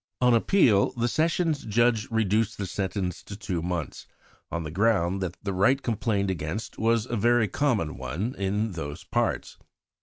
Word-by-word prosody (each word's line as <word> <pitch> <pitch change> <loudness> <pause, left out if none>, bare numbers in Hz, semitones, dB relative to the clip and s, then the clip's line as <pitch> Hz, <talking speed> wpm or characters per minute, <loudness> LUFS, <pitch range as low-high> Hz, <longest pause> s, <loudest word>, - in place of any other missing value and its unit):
On 125 -1 +4
appeal, 115 - +4
the 120 -1 0
Sessions 160 +1 +1
Judge 115 0 +2
reduced 110 0 +1
the 100 - -3
sentence 95 -1 -3
to 100 - -9
two 95 -5 -3
months, 85 -1 -4 0.4
on 85 -1 -2
the 75 - -6
ground 95 -1 +1
that 90 -1 -3
the 100 -1 -2
rite 120 +9 +3
complained 105 -4 0
against 95 +6 -5
was 115 0 +2
a 120 - -3
very 115 +1 +3
common 105 - 0
one 80 - -3
in 100 +2 -1
those 75 -4 -6
parts. - - -2
105 Hz, 160 wpm, -26 LUFS, 95-115 Hz, 0.4 s, On